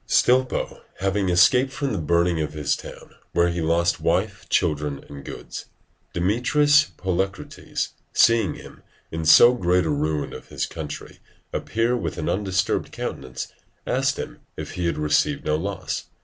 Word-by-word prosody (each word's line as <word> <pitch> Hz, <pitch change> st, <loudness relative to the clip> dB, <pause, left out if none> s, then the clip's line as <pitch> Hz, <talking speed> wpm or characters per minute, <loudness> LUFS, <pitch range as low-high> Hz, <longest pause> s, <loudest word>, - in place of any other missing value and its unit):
Stilpo 130 Hz, +1 st, +2 dB, 0.2 s
having 95 Hz, 0 st, 0 dB
escaped 125 Hz, +9 st, +5 dB
from 140 Hz, 0 st, -2 dB
the 100 Hz, -, -1 dB
burning 85 Hz, +1 st, +2 dB
of 75 Hz, -, -3 dB
his 75 Hz, -1 st, 0 dB
town, -, -, -11 dB, 0.2 s
where 85 Hz, 0 st, +3 dB
he 85 Hz, 0 st, -2 dB
lost 85 Hz, +2 st, +1 dB
wife, 95 Hz, +3 st, 0 dB
children, 75 Hz, -5 st, 0 dB
and 70 Hz, -1 st, -10 dB
goods, -, -, -8 dB, 0.5 s
Demetrius 145 Hz, +10 st, +3 dB
Poliorcetes 95 Hz, +1 st, -2 dB, 0.2 s
seeing 115 Hz, -7 st, +4 dB
him, -, -, -12 dB, 0.3 s
in 80 Hz, 0 st, -3 dB
so 120 Hz, +10 st, +8 dB
great 90 Hz, -6 st, +2 dB
a 80 Hz, -, 0 dB
ruin 75 Hz, +1 st, -1 dB
of -, -, -10 dB
his -, -, -2 dB
country, 75 Hz, -3 st, -7 dB, 0.3 s
appear 115 Hz, +2 st, 0 dB
with 85 Hz, -10 st, -3 dB
an 80 Hz, -, -2 dB
undisturbed 95 Hz, -1 st, 0 dB
countenance, 65 Hz, -, -5 dB, 0.4 s
asked -, -, +1 dB
him -, -, -6 dB, 0.2 s
if -, -, -6 dB
he 90 Hz, -1 st, -2 dB
had 85 Hz, -, -1 dB
received 75 Hz, -, +1 dB
no 75 Hz, -, +2 dB
loss? 95 Hz, +4 st, -3 dB
90 Hz, 150 wpm, -24 LUFS, 80-105 Hz, 0.5 s, so